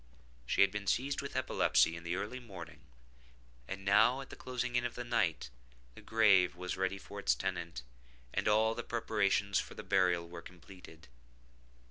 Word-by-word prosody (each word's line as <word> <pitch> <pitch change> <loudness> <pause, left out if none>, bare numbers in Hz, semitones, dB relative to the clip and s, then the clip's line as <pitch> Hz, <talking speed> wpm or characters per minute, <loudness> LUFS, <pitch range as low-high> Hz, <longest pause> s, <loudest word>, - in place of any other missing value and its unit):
She - - +2
had 100 - +6
been 100 0 -5
seized 140 +2 0
with 140 - -7
epilepsy 130 -9 +2
in 85 - -9
the 85 +1 -2
early 105 +7 -4
morning, 100 -8 -10 0.9
and 95 0 -6
now, 105 +6 +5
at 135 - -11
the - - -8
closing 125 -1 -4
in 120 - +2
of 120 -1 -3
the 120 - -4
night, 105 -9 0 0.4
the - - -13
grave 100 -6 +4
was 90 0 -4
ready 95 +1 -1
for 100 +1 -9
its - - +2
tenant, 85 -8 -4 0.5
and - - -1
all 110 +1 +4
the 120 - -4
preparations 105 -4 0
for - - -6
the - - -7
burial 90 -2 +2
were 85 0 -9
completed. 90 -4 -14
100 Hz, 175 wpm, -33 LUFS, 90-115 Hz, 0.9 s, had